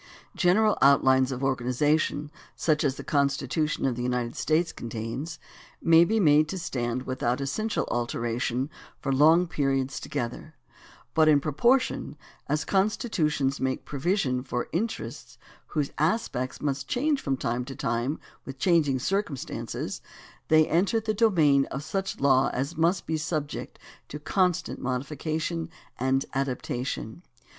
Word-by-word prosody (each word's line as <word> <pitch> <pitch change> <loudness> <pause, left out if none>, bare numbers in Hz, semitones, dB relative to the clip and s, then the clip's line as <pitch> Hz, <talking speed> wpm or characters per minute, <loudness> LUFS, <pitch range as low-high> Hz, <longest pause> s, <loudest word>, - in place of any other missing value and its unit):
General 210 +4 +3
outlines 130 -1 +5
of 130 +1 -4
organization, 145 +3 +1 0.2
such 155 -2 +1
as 135 -3 +1
the - - -8
Con 140 -1 +2
stitution 140 +2 -1
of 125 - -1
the 120 - -4
United 125 -1 -1
States 160 +1 +1
contains, 120 +8 -5 0.4
may 165 0 +6
be 220 +5 +1
made 155 -4 +5
to 190 - -3
stand 125 -7 -3
vrithout 130 0 -1
essential 215 +11 -1
alteration 120 +3 -1 0.3
for 135 - -1
long 160 +6 +5
periods 135 -5 -1
together, 125 +6 -5 0.6
but 160 -1 +4
in 150 -2 +6
proportion 195 - +1 0.3
as 150 +1 0
constitutions 185 - 0
make 130 0 -2
provision 145 -3 0
for 125 -1 -3
interests 220 +7 -4 0.3
whose 150 -3 -2
aspects 150 - -1
must 135 -2 -2
change 285 +2 +1
from 135 -1 -1
time 120 0 -1
to 135 +1 -8
time 120 +7 -1 0.2
with 135 0 -8
changing 155 -4 +3
circum 190 +1 -1
stances - - -5 0.5
they 155 0 +5
enter 190 +8 +2
the 220 -1 -1
domain 160 -11 +4
of 135 - -6
such 195 +4 -3
law 135 -1 +4
as 140 +6 -2
must 170 +3 +1
be 160 - -1
subject 150 -1 -4 0.3
to 150 - -6
constant 180 +3 0
modification 155 +5 -3 0.3
and 130 +2 +1
adaptation. 130 -1 -3
145 Hz, 135 wpm, -27 LUFS, 130-165 Hz, 0.6 s, may